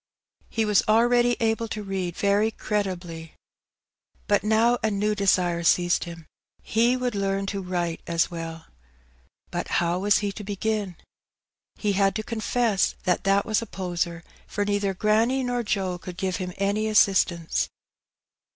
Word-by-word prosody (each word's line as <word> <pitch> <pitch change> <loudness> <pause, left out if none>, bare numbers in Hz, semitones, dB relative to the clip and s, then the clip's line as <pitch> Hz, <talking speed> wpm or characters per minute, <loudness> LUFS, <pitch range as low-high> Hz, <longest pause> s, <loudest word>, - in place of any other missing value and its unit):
He 225 -1 0
was 210 -2 +4
already 240 +2 +4
able 225 0 0
to 215 -1 -5
read 190 -3 -3
very 205 +2 +2
creditably. 180 -7 -4 0.9
But 205 -1 +2
now 225 +3 +3
a 220 - +1
new 210 +1 0
desire 180 -4 +2
seized 175 +1 +2
him 170 -2 -9 0.2
— - - -39
he 235 +3 +4
would 250 -1 -1
learn 195 -1 -1
to 200 - -3
write 175 -2 -2
as 170 0 +1
well. 165 -1 -6 0.9
But - - -3
how 175 +1 +1
was 205 +1 +3
he 205 -1 -1
to 205 - -8
begin? 205 -1 -2 0.8
He 210 - -1
had 195 0 +2
to 215 - -2
confess 225 -2 0
that 185 -1 0
that 195 0 +3
was 215 0 +1
a 230 - -6
poser, 175 -3 -3 0.2
for 205 - -2
neither 200 -1 0
granny 225 +7 +2
nor 245 -1 -1
Joe 190 -5 -2
could 180 -1 -9
give 185 -1 -1
him 180 -1 -5
any 205 +2 0
assistance. 190 -5 +2
200 Hz, 155 wpm, -25 LUFS, 180-220 Hz, 0.9 s, was